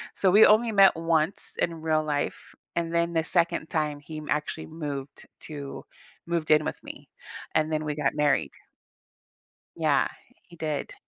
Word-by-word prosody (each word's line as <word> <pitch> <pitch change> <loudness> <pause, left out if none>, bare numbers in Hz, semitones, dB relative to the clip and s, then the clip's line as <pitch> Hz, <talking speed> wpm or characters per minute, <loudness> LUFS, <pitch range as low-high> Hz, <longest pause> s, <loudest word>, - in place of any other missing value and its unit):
So 190 - +3
we 210 +3 +8
only 225 +2 +4
met 195 -2 +6
once 165 +1 0
in 165 -1 -1
real 155 -1 +1
life, 145 -2 -3 0.2
and 170 0 -1
then 170 0 +1
the 165 -1 +1
2nd 170 -1 0
time, 150 -2 -1
he 155 +1 -8
actually 150 +1 -2
moved 145 -4 -6
t - - -26 0.2
to 145 -3 -7 0.4
moved 170 -2 -1
in 155 - +5
with - - -5
me, - - -11 0.5
and 155 0 +2
then 155 0 -1
we 150 -1 -2
got 145 -2 0
married. 145 - +2 1.3
Yeah, - - +3 0.4
he 175 - -15
did. 155 -3 -3
155 Hz, 165 wpm, -27 LUFS, 150-170 Hz, 1.3 s, we